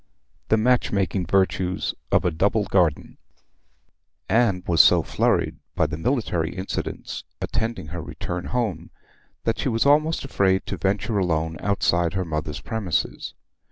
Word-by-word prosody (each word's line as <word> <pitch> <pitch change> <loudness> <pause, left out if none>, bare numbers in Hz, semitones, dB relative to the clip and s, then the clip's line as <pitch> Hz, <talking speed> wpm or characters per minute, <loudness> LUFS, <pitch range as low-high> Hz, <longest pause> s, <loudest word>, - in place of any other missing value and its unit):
THE 110 - +4
MATCH 125 +3 +2
MAKING 95 -2 0
VIRTUES 95 0 +1 0.2
OF - - +3
A 90 - +2
DOUBLE 100 +7 +1
GARDEN 85 -6 +1 1.1
Anne 105 -6 +2
was 85 -3 +6
so - - +5
flurried - - +1 0.2
by - - +2
the - - -3
military 90 - -1
incidents 95 +2 -4 0.2
attending 115 -8 -3
her 85 +1 -5
return 90 +3 -5
home 105 -10 -2 0.5
that 115 - -1
she - - 0
was 115 +1 +1
almost 155 +2 +3
afraid 95 -7 +1
to - - -4
venture 100 +2 0
alone 80 -3 0
outside 85 -4 +1
her 95 -1 -1
mother's 75 -2 -4
premises. 100 -6 -2
95 Hz, 140 wpm, -24 LUFS, 85-110 Hz, 1.1 s, was